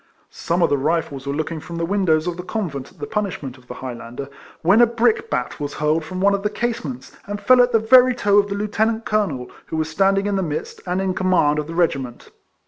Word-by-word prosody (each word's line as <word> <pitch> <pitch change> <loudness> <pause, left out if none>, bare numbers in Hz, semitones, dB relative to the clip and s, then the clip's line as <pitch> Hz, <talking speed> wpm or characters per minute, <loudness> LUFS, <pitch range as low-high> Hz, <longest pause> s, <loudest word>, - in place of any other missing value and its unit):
Some 170 +1 -1
of - - +2
the 145 - +2
Rifles 145 -2 -1
were 140 - -1
looking 155 +1 -3
from 170 +2 -9
the 165 0 -1
windows 170 -4 +1
of 175 -1 -2
the 180 - -6
convent 170 - -4
at 185 - -24
the 145 - -5
punishment 155 - -4
of 125 - -23
the - - -8
Highlander, 125 +1 -7 0.3
when 195 +8 +5
a 240 - +7
brickbat 230 - 0
was 145 -1 -4
hurled 155 +2 +1
from 185 +4 -6
one 200 +1 +4
of 200 - 0
the 210 - 0
casements, 155 - -4
and 205 0 -4
fell 255 +3 +5
at 245 0 +3
the - - +5
very 250 +3 +6
toe 205 -3 +4
of 205 - +1
the 200 - -2
lieutenant 220 +2 -1
colonel, 190 -13 -1 0.2
who 160 - -4
was 155 0 -1
standing 195 +4 +2
in 205 -1 0
the - - 0
midst, 155 -3 -4
and 180 +1 0
in 190 -1 0
command 180 -6 +2
of 150 - -4
the 165 - -7
regiment. 135 -8 -1
180 Hz, 235 wpm, -21 LUFS, 150-205 Hz, 0.3 s, a